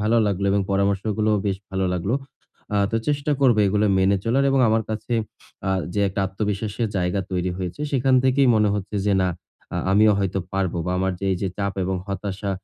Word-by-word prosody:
ভালো 110 Hz, +2 st, +2 dB
লাগলো। 100 Hz, -1 st, -1 dB
এবং 100 Hz, +1 st, +2 dB
পরামর্শগুলোও 100 Hz, +2 st, +1 dB
বেশ 95 Hz, -1 st, 0 dB
ভালো 95 Hz, 0 st, -1 dB
লাগলো। 90 Hz, +6 st, -1 dB, 0.6 s
আ -, -, +3 dB
তো 115 Hz, -, 0 dB
চেষ্টা 145 Hz, +1 st, 0 dB
করবো 125 Hz, -5 st, +4 dB
এগুলো 105 Hz, +2 st, +2 dB
মেনে 95 Hz, +1 st, +3 dB
চলার 130 Hz, +4 st, +2 dB
এবং 135 Hz, 0 st, +3 dB
আমার 110 Hz, +1 st, +2 dB
কাছে 110 Hz, +2 st, -4 dB, 0.6 s
আ -, -, +1 dB, 0.2 s
যে 105 Hz, -, +1 dB
একটা 100 Hz, +1 st, -3 dB
আত্মবিশ্বাসের 105 Hz, +3 st, -2 dB
জায়গা 90 Hz, +1 st, 0 dB
তৈরি 90 Hz, 0 st, -1 dB
হয়েছে, 90 Hz, +7 st, -5 dB
সেখান 135 Hz, -1 st, +3 dB
থেকেই 130 Hz, 0 st, +4 dB
মনে 105 Hz, -1 st, +3 dB
হচ্ছে 105 Hz, +1 st, -4 dB
যে 100 Hz, -, +3 dB
না, 90 Hz, -, +2 dB, 0.5 s
আ -, -, -1 dB, 0.2 s
আমিও 105 Hz, +1 st, +5 dB
হয়তো 95 Hz, -1 st, -1 dB
পারবো 95 Hz, -2 st, -1 dB
বা -, -, -1 dB
আমার 95 Hz, 0 st, 0 dB
যে 100 Hz, -, -4 dB
এইযে 95 Hz, +1 st, -2 dB
চাপ 100 Hz, -1 st, -1 dB
এবং 95 Hz, +1 st, -1 dB
হতাশা 100 Hz, +1 st, -3 dB
100 Hz, 195 wpm, -23 LUFS, 95-110 Hz, 0.6 s, আমিও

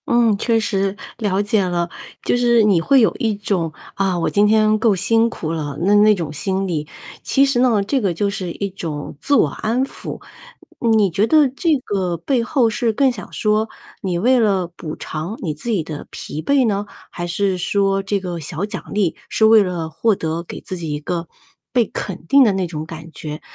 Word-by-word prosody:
嗯， 235 Hz, -3 st, +3 dB
确 225 Hz, +2 st, +1 dB
实。 195 Hz, -2 st, -1 dB, 0.2 s
了 200 Hz, -3 st, +1 dB
解 205 Hz, 0 st, +1 dB
了。 175 Hz, -1 st, -1 dB, 0.3 s
就 -, -, +1 dB
是 240 Hz, -2 st, +4 dB
你 195 Hz, -5 st, +4 dB
会 270 Hz, +9 st, +4 dB
有 220 Hz, -, +3 dB
一 225 Hz, -5 st, 0 dB
种， 195 Hz, -5 st, -1 dB, 0.2 s
“啊， 195 Hz, -2 st, 0 dB
我 170 Hz, -, 0 dB
今 205 Hz, +1 st, +3 dB
天 215 Hz, 0 st, +4 dB
够 220 Hz, -2 st, +3 dB
辛 225 Hz, +5 st, +2 dB
苦 160 Hz, -8 st, -5 dB
了”， 150 Hz, -4 st, -4 dB
那 200 Hz, +3 st, +3 dB
那 210 Hz, +1 st, +6 dB
种 165 Hz, -5 st, -4 dB
心 190 Hz, +5 st, -1 dB
理。 155 Hz, -4 st, -2 dB, 0.4 s
其 275 Hz, -, +3 dB
实 275 Hz, -3 st, +1 dB
呢， 235 Hz, -5 st, +3 dB
这 260 Hz, +6 st, 0 dB
个 195 Hz, -5 st, +1 dB
就 200 Hz, +4 st, 0 dB
是 190 Hz, -4 st, -4 dB
一 200 Hz, +3 st, -3 dB
种 160 Hz, -7 st, -6 dB
自 285 Hz, -, +3 dB
我 -, -, +4 dB
安 240 Hz, +4 st, -1 dB
抚。 -, -, -8 dB, 0.8 s
你 205 Hz, -4 st, +3 dB
觉 200 Hz, +6 st, +2 dB
得 305 Hz, 0 st, +5 dB
这 305 Hz, +4 st, +1 dB
个 185 Hz, -4 st, -1 dB
背 235 Hz, -, 0 dB
后 250 Hz, -1 st, +2 dB
是 230 Hz, +1 st, 0 dB
更 265 Hz, +4 st, +2 dB
想 215 Hz, -5 st, -9 dB
说 215 Hz, +1 st, 0 dB, 0.3 s
你 180 Hz, -3 st, -1 dB
为 250 Hz, +7 st, +3 dB
了 200 Hz, -5 st, +2 dB
补 155 Hz, -3 st, -6 dB
偿 165 Hz, +8 st, -5 dB
你 160 Hz, -5 st, -1 dB
自 155 Hz, +11 st, -6 dB
己 200 Hz, -8 st, +1 dB
的 155 Hz, -2 st, -7 dB
疲 155 Hz, -, -6 dB
惫 275 Hz, -, +3 dB
呢？ 205 Hz, -1 st, -1 dB, 0.2 s
还 175 Hz, 0 st, -5 dB
是 190 Hz, +2 st, 0 dB
说 195 Hz, +1 st, +1 dB
这 195 Hz, +1 st, -1 dB
个 180 Hz, -3 st, -5 dB
小 165 Hz, +4 st, -3 dB
奖 210 Hz, -, -6 dB
励 200 Hz, -5 st, +1 dB
是 220 Hz, -, +3 dB
为 220 Hz, 0 st, +7 dB
了 175 Hz, -4 st, -3 dB
获 220 Hz, +6 st, +1 dB
得 160 Hz, -1 st, -3 dB
给 170 Hz, -, -8 dB
自 185 Hz, -, -6 dB
己 165 Hz, -3 st, -4 dB
一 145 Hz, -, -2 dB
个 170 Hz, +2 st, -4 dB, 0.4 s
被 245 Hz, -2 st, +3 dB
肯 190 Hz, -5 st, -6 dB
定 275 Hz, +10 st, +6 dB
的 225 Hz, -, +4 dB
那 190 Hz, -1 st, 0 dB
种 155 Hz, -3 st, -5 dB
感 160 Hz, 0 st, -9 dB
觉？ 150 Hz, -1 st, -7 dB
200 Hz, 225 characters per minute, -20 LUFS, 170-225 Hz, 0.8 s, 为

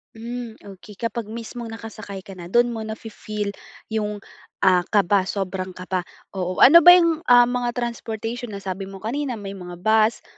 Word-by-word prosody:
Hmm. 235 Hz, 0 st, -6 dB
Okey 200 Hz, +1 st, -12 dB
kapag 230 Hz, 0 st, -4 dB
mismong 230 Hz, +1 st, -7 dB
nakasakay 220 Hz, -4 st, -8 dB
ka 195 Hz, -, -11 dB
na 170 Hz, -, -8 dB
doon 240 Hz, +4 st, +3 dB
mo 225 Hz, -, -5 dB
nafi-feel 215 Hz, -1 st, -5 dB, 0.4 s
'yong, 210 Hz, -2 st, -2 dB, 0.4 s
ah, 185 Hz, -1 st, +6 dB
kaba, 200 Hz, -1 st, +2 dB
sobrang 190 Hz, -2 st, -4 dB
kaba. 185 Hz, -1 st, -3 dB, 0.2 s
Oo, 185 Hz, -1 st, 0 dB
ano 335 Hz, +5 st, +10 dB
ba 355 Hz, +2 st, +9 dB
'yong, 335 Hz, -2 st, +3 dB
ah, 245 Hz, 0 st, +8 dB
mga 245 Hz, 0 st, -1 dB
transportation 235 Hz, 0 st, -4 dB
na 200 Hz, -2 st, -8 dB
sabi 190 Hz, 0 st, -4 dB
mo 195 Hz, +1 st, -11 dB
kanina 260 Hz, +2 st, -2 dB
may 200 Hz, -2 st, -7 dB
mga 180 Hz, -2 st, -8 dB
bus, 220 Hz, +4 st, +2 dB
220 Hz, 170 wpm, -23 LUFS, 195-235 Hz, 0.4 s, ano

